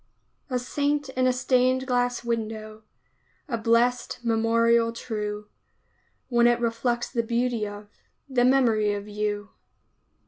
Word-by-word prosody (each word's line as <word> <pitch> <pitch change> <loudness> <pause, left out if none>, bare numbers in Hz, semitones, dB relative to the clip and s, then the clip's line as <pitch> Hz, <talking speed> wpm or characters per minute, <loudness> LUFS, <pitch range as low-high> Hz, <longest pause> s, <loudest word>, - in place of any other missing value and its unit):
A 255 - 0
Saint 285 +3 -1
in 255 -1 +1
a - - +4
stained 255 0 +2
glass 245 -1 0
window, 220 -2 -4 0.7
A 250 - -2
blest 235 +2 +1
memorial 230 0 +3
true, 210 -2 -5 0.8
When 240 -2 +4
it 240 0 +3
reflects 235 +1 -1
the 235 - +1
beauty 235 -1 -1
of 205 0 -9 0.4
The 255 -3 +1
memory 235 -5 +3
of 205 0 -6
you. 210 0 -3
235 Hz, 125 wpm, -25 LUFS, 220-250 Hz, 0.8 s, a